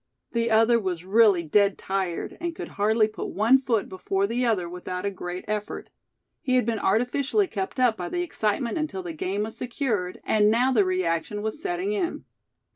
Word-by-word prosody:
The 230 0 0
other 225 +1 +4
was 180 -4 -3
really 200 -3 +4
dead 200 +5 +3
tired, 190 -3 -3
and 340 -1 -3
could - - -6
hardly 215 +2 +2
put 215 - -6
one 230 +6 +4
foot 235 -6 0
before 195 +1 -1
the 235 +4 -1
other 215 -8 +1
without 180 +1 -5
a 200 - 0
great 180 -1 -6
effort. 210 -1 -4 0.5
He 255 - +1
had 250 - +3
been 225 -2 -1
artificially 250 - +1
kept 380 -5 -4
up 245 -3 +3
by 175 -1 -4
the 355 - -1
excitement 230 - -1
until 250 -12 -3
the 175 -2 -5
game 190 +6 -2
was 220 +1 -6
secured, 235 -8 -2
and 210 -1 +3
now 245 +4 +3
the 215 -6 +4
reaction 185 +2 -1
was 220 +8 -4
setting 370 +2 -2
in. 380 -5 -2
215 Hz, 190 wpm, -25 LUFS, 190-250 Hz, 0.5 s, other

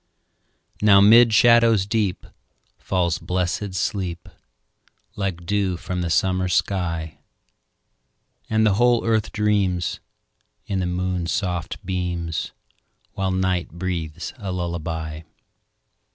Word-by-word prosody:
Now 100 -2 +6
'mid 115 +4 +7
shadows 115 -2 +5
deep 105 -3 -1 0.5
Falls 85 -3 0
blessed 95 +2 -2
sleep, 90 -3 -3 0.9
Like 95 -4 -3
dew 95 -2 0
from 90 +1 -4
the 85 - -2
summer 95 +2 +1
sky; 85 -3 -1 1.3
And 110 0 +2
the 105 - +4
whole 120 -1 +3
earth 110 -2 +1
dreams, 100 -5 0 0.7
In 95 - -2
the 90 - -1
moon's 90 0 -2
soft 90 -1 -3
beams, 90 -3 -3 0.6
While 95 -1 -1
night 95 -3 -1
breathes 85 -2 -4
a 100 -5 -5
lullaby. 80 -3 -4
95 Hz, 105 wpm, -22 LUFS, 85-100 Hz, 1.3 s, mid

